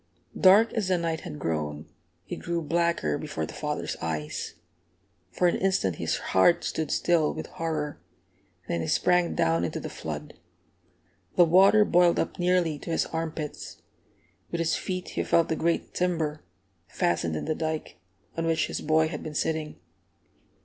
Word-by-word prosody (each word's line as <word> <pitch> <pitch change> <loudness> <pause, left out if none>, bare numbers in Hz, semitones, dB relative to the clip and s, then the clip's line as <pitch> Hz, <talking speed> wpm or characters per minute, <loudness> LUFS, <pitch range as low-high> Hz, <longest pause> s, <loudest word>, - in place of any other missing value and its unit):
Dark 200 +4 +6
as 215 -4 -1
the 185 -1 +2
night 165 -2 -1
had 75 - -8
grown, 75 -1 -3 0.4
it - - -5
grew 170 -1 -3
blacker 170 - 0
before 80 - -4
the - - -10
father's - - -3
eyes. 80 -2 -4 0.8
For 180 - +2
an 175 - +2
instant 185 - +1
his - - -1 0.2
heart 95 - +5
stood 160 -2 -2
still 165 -3 +2
with - - -6
horror, 155 -3 -4 0.7
then 85 - -1
he 80 - -3
sprang 180 - +2
down 80 +1 +2
into 85 - -2
the - - -6
flood. - - -6 1.0
The 175 - +7
water 195 +5 +6
boiled 175 -2 +4
up - - -2
nearly 175 -4 +2
to - - -8
his 165 - +1
arm 165 0 -3
pits. 150 -3 -7 0.7
With 170 - -1
his 165 -1 +1
feet 185 -1 -4
he - - -2
felt 170 - +2
the 160 - +1
great 165 +1 -1
timber, 160 -4 -1 0.5
fastened 85 -2 0
in - - -3
the 155 - 0
dike, 155 - -4 0.4
on 165 0 -1
which 165 -1 +2
his - - -4
boy 155 +1 +3
had 155 -2 -5
been 155 - -7
sitting. 155 -1 -1
160 Hz, 165 wpm, -27 LUFS, 145-175 Hz, 1.0 s, The